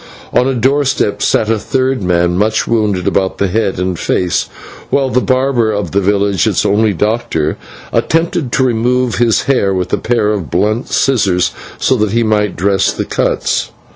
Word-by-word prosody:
On 125 - +3
a 135 - 0
doorstep 130 -3 0
sat 110 - +1
a 110 -1 +1
third 130 +1 -1
man, 90 -1 +1
much 110 +3 +1
wounded 105 -6 0
about 95 -1 0
the 100 - 0
head 100 0 -1
and 90 -1 -2
face, 90 -1 -1 0.4
while 135 -2 +1
the 125 - +2
barber 130 -4 +1
of 105 -1 -3
the 100 - +1
village, 100 -1 +1
its - - 0
only 105 +2 +2
doctor, 100 -6 -1 0.4
attempted 165 -5 0
to 130 - +2
remove 125 0 0
his 115 -2 +2
hair 100 -8 +1
with 90 -1 -3
a - - +3
pair 110 -3 0
of 95 -8 -3
blunt 105 +7 0
scissors, 100 -9 +1 0.3
so 130 - +1
that 105 -2 0
he 115 0 +2
might 105 -2 0
dress 95 +2 +1
the - - -4
cuts. - - -1
110 Hz, 175 wpm, -14 LUFS, 95-125 Hz, 0.4 s, On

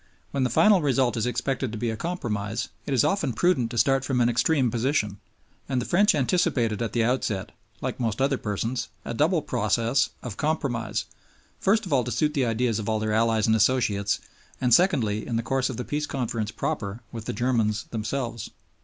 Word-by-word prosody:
When 140 -2 0
the 125 - +1
final 200 - +5
result 135 -4 +2
is 115 +1 0
expected 125 0 -1
to 110 - -5
be 115 +1 -1
a - - -3
compromise, 115 - -3 0.2
it 140 - -1
is 120 - +4
often 195 -10 +1
prudent 125 -2 +2
to 120 - -6
start 135 +3 +3
from 130 -1 0
an 120 0 +4
extreme 125 +1 +2
position; 115 -5 0 0.5
and 130 -2 +1
the 125 - -3
French 200 +2 +4
anticipated 125 - +1
at 115 - -2
the 115 - +2
outset 110 -5 -1 0.3
like 130 0 -3
most 115 -2 -1
other 135 0 +1
persons 115 +4 -2 0.2
a - - -3
double 155 +5 +2
process 115 +2 +1
of 115 -5 -6
compromise, 140 -7 -1 0.5
first 215 +2 +2
of 175 - -3
all 130 -3 +3
to 125 - -4
suit 150 +2 +1
the 135 -5 +1
ideas 115 -1 0
of 105 - -5
their 110 0 -1
allies 110 -1 +2
and 110 - +3
associates, 105 -3 +2 0.4
and 125 -2 +2
secondly 115 - +3
in 120 - -2
the 115 - 0
course 130 +2 0
of 125 - -5
the 125 - -4
Peace 150 0 -2
Conference 115 -5 -2
proper 105 0 -3
with 115 -2 -7
the - - -2
Germans 110 -2 +1
themselves. 115 0 -3
120 Hz, 195 wpm, -26 LUFS, 110-135 Hz, 0.5 s, final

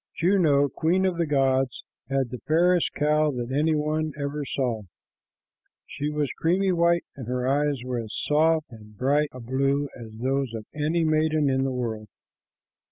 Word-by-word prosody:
Juno, 165 -6 +3
queen 170 +8 +1
of 185 -2 0
the 170 - +1
gods, 135 -2 +1 0.3
had 135 -3 0
the 125 - -5
fairest 175 +3 +3
cow 150 +1 +2
that 120 0 -4
any 155 +2 +2
one 155 0 -1
ever 145 +1 -3
saw. 125 -5 -2 1.0
She 145 +1 -4
was 150 -3 -1
creamy 185 +4 +2
white, 170 0 +2
and 130 -5 -8
her 125 0 -1
eyes 140 -1 +1
were 125 -1 -3
of 115 - -4
as 110 - -8
soft 155 +1 +1
and 105 -2 -14
bright 145 +5 +2
a 130 - -10
blue 135 +4 0
as 115 -3 -10
those 130 +1 -1
of 110 -1 -6
any 155 +3 0
maiden 155 -2 +2
in 130 0 +1
the 135 - -1
world. 115 -4 -3
145 Hz, 170 wpm, -25 LUFS, 130-155 Hz, 1.0 s, Juno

